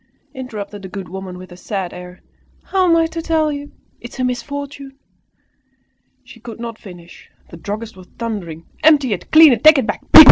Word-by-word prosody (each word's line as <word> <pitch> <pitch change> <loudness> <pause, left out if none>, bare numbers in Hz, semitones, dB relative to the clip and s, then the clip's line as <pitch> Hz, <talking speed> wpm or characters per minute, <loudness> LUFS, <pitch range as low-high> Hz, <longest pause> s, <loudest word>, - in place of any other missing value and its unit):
interrupted 215 -6 -7
the 190 - -8
good 190 -1 -7
woman, 185 +1 -8
with 185 0 -12
a - - -10
sad 185 0 -5
air, 180 0 -11 0.4
"how 375 -2 +1
am 335 - +5
I 330 0 +3
to 330 0 -5
tell 320 -2 0
you? 290 0 -7 0.3
It 240 - -10
is - - -12
a - - 0
misfortune!" 275 +2 -5 1.3
She 235 - -15
could 230 0 -10
not 230 -1 -7
finish, 175 -4 -14 0.2
the 170 - -10
druggist 210 +5 -6
was 185 -1 -14
thundering 180 -9 -5 0.2
"Empty 290 -7 +4
it! 185 - -7
Clean 315 -3 +8
it! - - -3
Take 310 0 +8
it 265 - +1
back! - - -3
230 Hz, 190 wpm, -18 LUFS, 190-285 Hz, 1.3 s, Clean